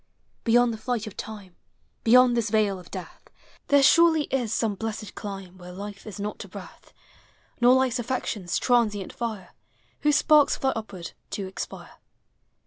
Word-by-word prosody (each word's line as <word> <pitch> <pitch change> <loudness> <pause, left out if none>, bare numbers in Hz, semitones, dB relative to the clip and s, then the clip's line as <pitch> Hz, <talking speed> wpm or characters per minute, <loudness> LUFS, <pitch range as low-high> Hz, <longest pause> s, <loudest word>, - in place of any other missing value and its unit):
Beyond 240 0 +4
the 220 - -7
flight 240 -1 -2
of 215 - -9
time, 200 -5 -8 0.5
Beyond 250 +1 +6
this 230 -2 0
vale 205 -3 +1
of 180 - -14
death. 185 -2 -9 0.4
There 285 -1 +5
surely 330 +1 +6
is 245 -5 0
some 225 -2 0
blessed 215 +1 -5
elime 195 -3 -7
Where 180 0 -10
life 200 +3 -8
is 205 -2 -8
not 210 +1 -4
a - - -12
breath, - - -12 0.7
Nor 245 +1 +7
life's 260 -2 +1
n 240 - -3
flections 215 -8 -2
transient 220 -6 +1
fire, 220 -6 -5 0.5
Whose 295 -1 +3
sparks 300 -1 +5
fly 265 -1 0
upward 200 -6 -6 0.2
to 200 - -4
expire. 190 - -8
220 Hz, 160 wpm, -26 LUFS, 200-245 Hz, 0.7 s, Nor